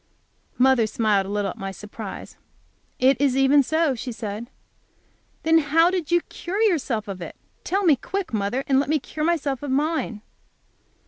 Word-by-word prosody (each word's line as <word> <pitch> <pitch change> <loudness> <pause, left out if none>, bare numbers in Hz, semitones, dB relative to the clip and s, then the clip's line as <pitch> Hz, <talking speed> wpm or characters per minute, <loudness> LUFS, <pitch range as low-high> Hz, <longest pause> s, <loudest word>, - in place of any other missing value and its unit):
Mother 255 -3 +4
smiled 210 -3 +1
a - - -7
little 205 -1 -1
at - - -13
my 195 - -4
surprise. 210 +1 -8 0.6
"It 265 +1 +3
is 270 -2 +2
even 270 +2 +5
so," 315 +1 +1
she 250 +1 -5
said. 220 0 -6 0.9
"Then 325 0 +5
how 325 +3 +3
did 360 -5 -2
you 345 0 +3
cure 370 +5 -6
yourself 270 - 0
of 190 -2 -6
it? 170 - -7 0.3
Tell 395 +3 0
me 325 -6 +5
quick, 375 +3 -5
mother, 215 +5 -1
and 270 -1 +3
let 280 - -1
me 310 - +3
cure 305 +2 -5
myself 300 -5 0
of 290 - -5
mine." 275 -6 -1
270 Hz, 175 wpm, -23 LUFS, 220-315 Hz, 0.9 s, even